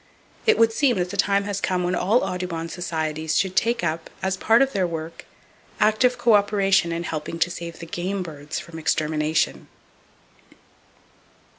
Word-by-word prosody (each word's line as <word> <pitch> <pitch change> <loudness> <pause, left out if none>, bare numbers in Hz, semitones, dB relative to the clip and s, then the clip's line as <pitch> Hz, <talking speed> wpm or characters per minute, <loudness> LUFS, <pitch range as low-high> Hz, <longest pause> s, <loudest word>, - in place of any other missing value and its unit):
It 445 - +5
would 225 0 +4
seem 255 -3 +2
that 180 0 -1
the - - -5
time 200 0 +2
has 200 -1 -3
come 180 -1 0
when 175 +1 0
all 205 +7 +2
Audubon 175 -2 -3
Societies 160 -3 -2
should 190 -1 0
take 235 +2 +1
up, 160 0 -2
as 190 0 0
a - - -17
part 230 +4 +5
of 270 - -2
their 190 -3 +1
work, 165 0 -6 0.5
active 215 +4 +3
co 230 - +3
operation 200 -3 +3
in 165 +1 -2
helping 160 0 -4
to 170 +1 +1
save 170 -1 -7
the 170 - -8
game 185 +3 -3
birds 150 -3 -7
from 165 -1 -7
extermination. 150 - 0
180 Hz, 170 wpm, -23 LUFS, 165-200 Hz, 0.5 s, It